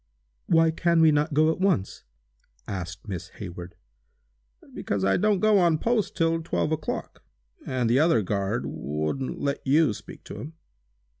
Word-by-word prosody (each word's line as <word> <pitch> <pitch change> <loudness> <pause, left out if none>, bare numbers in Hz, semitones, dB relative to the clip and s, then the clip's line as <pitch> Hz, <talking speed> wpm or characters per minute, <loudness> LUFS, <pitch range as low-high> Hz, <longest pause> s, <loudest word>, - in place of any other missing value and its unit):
"Why 165 0 +4
can 170 +1 +2
we 160 -1 +6
not 150 0 0
go 155 +1 +4
at 160 - -5
once?" 185 - 0 0.6
asked 95 0 -6
Miss 95 -5 -5
Hayward. 90 -3 -8 1.0
"Because 100 -2 -2
I 95 - +3
don't 210 -2 +2
go 215 -2 +5
on 170 -3 +3
post 230 +3 0
until 165 0 +2
twelve 160 -1 -1
o'clock, 155 -1 -4 0.5
and 125 -2 0
the 120 +4 +3
other 150 -9 +3
guard 100 +3 -1
wouldn't 75 - -3
let 140 -1 -2
you 145 -2 +3
speak - - -11
to - - -9
him." 155 +3 -8
145 Hz, 155 wpm, -26 LUFS, 100-165 Hz, 1.0 s, we